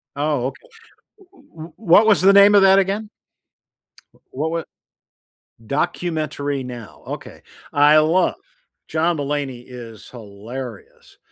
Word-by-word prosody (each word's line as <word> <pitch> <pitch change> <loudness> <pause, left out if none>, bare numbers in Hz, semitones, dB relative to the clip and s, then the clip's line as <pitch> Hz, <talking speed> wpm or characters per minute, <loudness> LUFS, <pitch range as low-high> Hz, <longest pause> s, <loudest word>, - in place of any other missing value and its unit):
Oh, 145 -3 -1
okay. - - -10 0.6
W 385 - -24 0.2
w - - -22
what 215 +1 +4
was 210 - +4
the 195 +1 +6
name 200 +1 +7
of 200 - +6
that 195 0 +6
again? 200 +2 -2 1.0
Wh - - -25 0.2
wa 160 +4 -2 1.0
Documentary 150 -2 -2
Now, 120 -3 -10
okay. - - -9 0.3
I 145 +1 +5
love 165 +4 +2 0.5
John 165 +1 0
Mulaney 140 -4 -4
is 115 -4 -11
hilarious. 115 +1 -10
150 Hz, 115 wpm, -20 LUFS, 125-185 Hz, 1.0 s, name